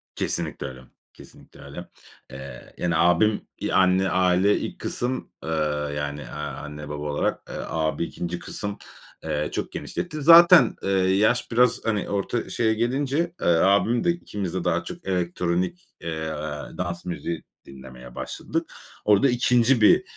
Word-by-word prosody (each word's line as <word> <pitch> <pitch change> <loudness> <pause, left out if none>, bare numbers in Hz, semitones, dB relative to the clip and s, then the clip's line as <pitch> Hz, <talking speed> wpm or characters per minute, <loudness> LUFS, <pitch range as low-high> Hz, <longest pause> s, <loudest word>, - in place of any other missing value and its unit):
Kesinlikle - - -2
öyle. 65 0 -10 0.3
Kesinlikle - - -16
öyle. 70 +6 -9 0.4
Eee, 65 -1 -10
yani, 85 -1 0
abim, 90 +6 +3
iii, - - -3
anne, 95 0 +4
aile, 95 +2 +3
ilk - - -6
kısım, 125 +1 -3
ııı, 75 -2 -1
yani, 75 0 -3
eee, 65 - -9
anne 75 0 -6
baba 75 0 -5
olarak, 75 -1 -1
eee, - - -6
abi 80 0 -1
2. 85 +1 -4
kısım, 100 +4 -4 0.5
eee, 75 +1 -2
çok - - -3
genişletti. 155 -4 -5
Zaten, 170 -3 +8
eee, - - -1
yaş 95 +5 +2
biraz, 125 0 +3
hani, 105 -3 -1
orta 100 +4 -2
şeye 110 -1 +1
gelince, 135 +8 0
eee, - - 0
abim 100 +7 +3
de, - - +2
ikimiz 105 - -5
de 95 -1 -2
daha 85 +1 0
çok 175 - -9
elektronik, 90 - -1
eee, 80 -1 -4 0.5
dans 85 -1 -4
müziği 85 -2 -4 0.2
dinlemeye 65 -2 -12
başladık. - - -4 0.3
Orada 105 +6 +5
2. 125 0 +3
bir, 105 - +6
90 Hz, 145 wpm, -24 LUFS, 80-115 Hz, 0.5 s, Zaten